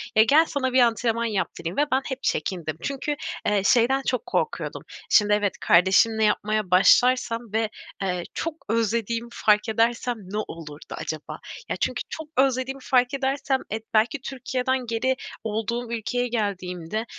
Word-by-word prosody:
Ya, 220 - +7
gel, 295 +8 +5
sana 260 -4 -2
bir 260 - +5
antrenman 230 -1 +2
yaptırayım 190 -5 -3
ve 290 - +4
ben 260 +1 +3
hep 265 0 -5
çekindim. 165 -5 -2
Çünkü, 280 +2 -2 0.3
eee, 205 -1 +2
şeyden 250 +5 +4
çok 250 - 0
korkuyordum, - - -2 0.3
şimdi 210 -1 +5
evet 205 -2 +1
kardeşimle 190 +6 +4
yapmaya 215 -2 +1
başlarsam 230 +5 +4
ve, 220 0 +1 0.3
eee, 180 -2 -1
çok 330 - -3 0.2
özlediğimi 230 +1 0
fark 210 +1 +2
edersem 230 +2 +1
ne 200 0 -7
olurdu 155 -3 -9
acaba? 155 -1 -5 0.3
Ya - - -1
çünkü - - -1
çok 320 -1 -6
özlediğimi 265 0 +1
fark 250 0 +2
edersem, 270 0 0
eee, 220 +1 -2
belki 230 +6 +2
Türkiye'den 260 -1 -2
geri 240 +3 0 0.3
olduğum 225 +2 -3
ülkeye 245 +2 -1
geldiğimde, 200 -3 -3
230 Hz, 145 wpm, -25 LUFS, 210-255 Hz, 0.3 s, Ya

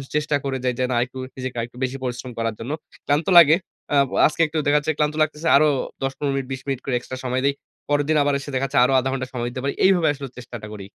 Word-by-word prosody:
চেষ্টা 150 0 +1
করে 135 -1 -2
যাই 125 -1 +1
যে, - - +2
না - - +1
একটু 130 +1 -13 0.2
নিজেকে 130 -1 -5
আরেকটু 120 +1 -5
বেশি 130 +1 -2
পরিশ্রম 125 0 -4
করার 115 -1 -1
জন্য। 120 +5 -5 0.4
ক্লান্ত 145 +2 +1
লাগে। 160 -1 +9 0.4
আ - - +3 0.3
আজকে 155 - -2
একটু 155 +1 -4
দেখাচ্ছে 150 +1 +2
ক্লান্ত 150 0 0
লাগতেছে 155 +1 0
আরো 155 +2 +4 0.4
১০ 135 - 0
১৫ 140 -2 -1
মিনিট 135 -1 -3
২০ 130 0 -4
মিনিট 135 -2 -1
করে 135 - 0
এক্সট্রা 130 +1 -7
সময় 130 +1 0
দেই। 140 - +3 0.4
পরেরদিন 145 +1 +2
আবার 145 0 +1
এসে 140 - -8
দেখাচ্ছে 135 +1 -1
আরো 135 +2 +3
আধা 130 - -1
ঘন্টা 130 -1 -3
সময় 120 -1 -2
দিতে 130 - -5
পারি। 140 - -1
এইভাবে 185 -4 +4
আসলে 140 -1 -7
চেষ্টাটা 120 -3 -8
করি। 100 -2 -8
135 Hz, 240 wpm, -22 LUFS, 125-145 Hz, 0.4 s, লাগে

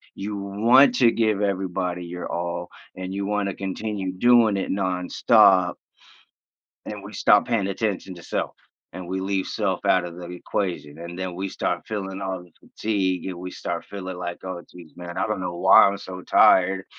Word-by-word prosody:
you 105 +1 -5
want 115 +7 +4
to 120 -2 +5
give 110 -3 +1
everybody 90 -3 -2
your 90 +1 -6
all, 85 0 -3 0.3
and 95 0 -6
you 100 0 -3
wanna 100 -1 -1
continue 95 0 -4
doing 115 0 +4
it 95 - -2
nonstop 95 0 +3 1.1
and - - -7
we - - -10
stop - - +4
paying 115 -5 0
attention 100 -1 -3
to 85 - -12
self, - - -3 0.4
and 90 -1 -8
we 95 +1 -3
leave 95 0 -1
self - - -2
out 95 -1 +3
of 85 -1 -8
the 90 -1 -8
equation, 90 -4 -4
and 85 +1 -8
then 95 -2 -4
we 95 +2 -3
start - - -3
feeling 95 -2 -4
all 95 -1 -4
the 90 - -19
fatigue, 95 -4 -1
and 95 - -4
we 90 +1 -6
start - - -5
feeling 95 -2 -7
like, 85 -1 -5
"Oh, 90 -2 -5
jeez, 85 -3 -14
man. 90 0 -7
I 95 - +1
don't 105 -3 -2
know 90 -1 -4
why 95 +2 +7
I'm 100 0 -1
so 95 -1 -8
tired." 95 +1 +4
95 Hz, 185 wpm, -24 LUFS, 90-100 Hz, 1.1 s, why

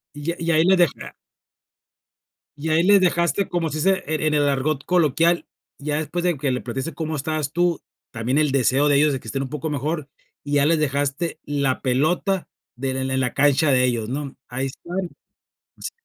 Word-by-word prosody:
Y 145 +3 -3
a - - -5
y 170 0 0
ahí 160 0 +4
le 190 +2 +4
deja 175 -6 0 1.4
y 160 +2 -3
ahí 160 +2 +3
le 200 +1 +6
dejaste 175 +2 +1
como 170 -2 -1
se 155 - -4
dice 190 +4 +2
en 155 0 -1
en 155 -1 +1
el 145 -1 +3
argot 140 +1 0
coloquial, 170 0 +2 0.3
ya 145 +1 -2
después 155 +3 -3
de 175 -4 +1
que 135 -1 -1
le 125 - -2
platicaste 135 +6 -4
cómo 160 +1 -3
estabas 150 0 -2
tú, 175 -1 +1 0.3
también 120 +5 -1
el 150 -2 +2
deseo 135 +2 +3
de 145 - +4
ellos 150 +1 +4
de 135 - -2
que - - -14
estén 135 - -2
un 130 - -6
poco 150 +1 -4
mejor. 150 +1 -2 0.4
Y 145 - -5
ya 145 -1 +4
les 160 +1 +3
dejaste 145 +3 -1
la 140 -3 -1
pelota 160 +8 0 0.3
del 130 +1 -2
en 130 0 -2
en 130 - +1
la 125 -2 -1
cancha 145 +1 +3
de 125 -1 +4
ellos, 120 -3 0
¿no? 140 0 -4
Ahí 130 +2 -3
están 175 +6 -5 0.7
así - - -5
150 Hz, 205 wpm, -22 LUFS, 135-165 Hz, 1.4 s, le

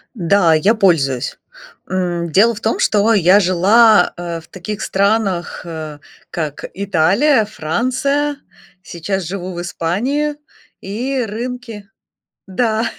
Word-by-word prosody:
Да, 175 -2 +3
я 190 +9 +3
пользуюсь. 150 - +1 0.5
М, 175 -3 -2
дело 225 +6 +4
в 210 - -9
том, 225 - -1
что 215 +2 +3
я 195 0 +5
жила, 200 +3 +4
э, 170 -1 -5
в 160 - -18
таких 195 +3 -7
странах, 200 -2 0
э, 155 -3 -7 0.3
как 155 -4 -4
Италия, 200 - +2
Франция. 260 - -1 0.4
Сейчас 185 +3 -4
живу 185 +1 -5
в 175 - -5
Испании. 245 - -2 0.5
И 245 +7 -2
рынки 230 -2 -6 0.6
Да, 220 +3 0
195 Hz, 115 wpm, -17 LUFS, 175-225 Hz, 0.6 s, я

